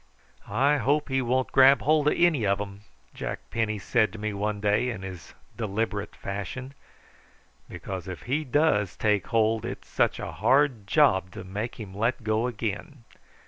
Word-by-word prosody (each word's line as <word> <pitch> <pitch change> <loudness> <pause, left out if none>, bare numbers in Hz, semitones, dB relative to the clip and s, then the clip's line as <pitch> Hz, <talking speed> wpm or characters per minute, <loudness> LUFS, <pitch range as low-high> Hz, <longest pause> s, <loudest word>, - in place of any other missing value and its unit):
"I 135 +8 +3
hope 145 +4 +1
he 135 0 +1
won't 130 +1 0
grab 135 -3 +6
hold 150 0 +3
of - - +3
any 170 -8 +3
of 100 0 +2
'em," 100 0 -6 0.3
Jack - - -4
Penny 110 -2 0
said 110 +1 +1
to - - -7
me 105 0 -3
one 105 +1 -2
day 105 +4 +1
in 105 -6 -5
his 95 -2 -9 0.2
deliberate 105 -1 -3
fashion; 100 +7 -6 1.0
"because 95 -2 -6
if 90 -2 -7
he 145 +5 -1
does 130 - +1
take 105 -4 +1
hold 110 -1 +2
it's - - -6
such - - +1
a - - -5
hard 130 -6 +2
job 95 -1 +3
to - - -7
make 105 +7 -5
him 100 -4 -8
let 115 +4 -1
go 110 +2 +1
again. 115 - -5
110 Hz, 170 wpm, -27 LUFS, 100-130 Hz, 1.0 s, grab